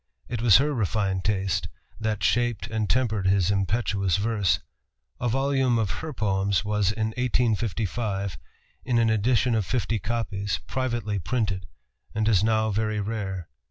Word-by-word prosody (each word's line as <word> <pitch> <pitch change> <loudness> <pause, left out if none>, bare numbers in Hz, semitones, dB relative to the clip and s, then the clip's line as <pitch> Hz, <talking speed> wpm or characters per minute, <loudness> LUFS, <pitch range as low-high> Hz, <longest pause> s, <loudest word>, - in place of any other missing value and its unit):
It 120 -2 -3
was 115 -4 +7
her 145 +3 +1
refined 100 -5 0
taste 95 -2 0 0.3
that 110 -2 -2
shaped 120 -5 +1
and 110 -1 -2
tempered 110 -6 +1
his 95 -1 +3
impetuous 100 -2 +1
verse. 105 -2 +1 0.6
A 120 - 0
volume 135 -1 +2
of 110 -4 0
her 155 +10 -5
poems 100 -3 0
was 105 -2 +1
in 110 0 -1
1855, 110 - -1 0.4
in 120 -2 +1
an 115 -1 +3
edition 115 +3 +2
of 110 -2 +2
fifty 115 0 -1
copies, 105 -1 -2
privately 120 -5 -2
printed, 105 -1 -1 0.5
and 110 0 +1
is 105 -3 +4
now 110 0 +2
very 110 +1 0
rare. 100 -4 -3
110 Hz, 145 wpm, -26 LUFS, 100-115 Hz, 0.6 s, was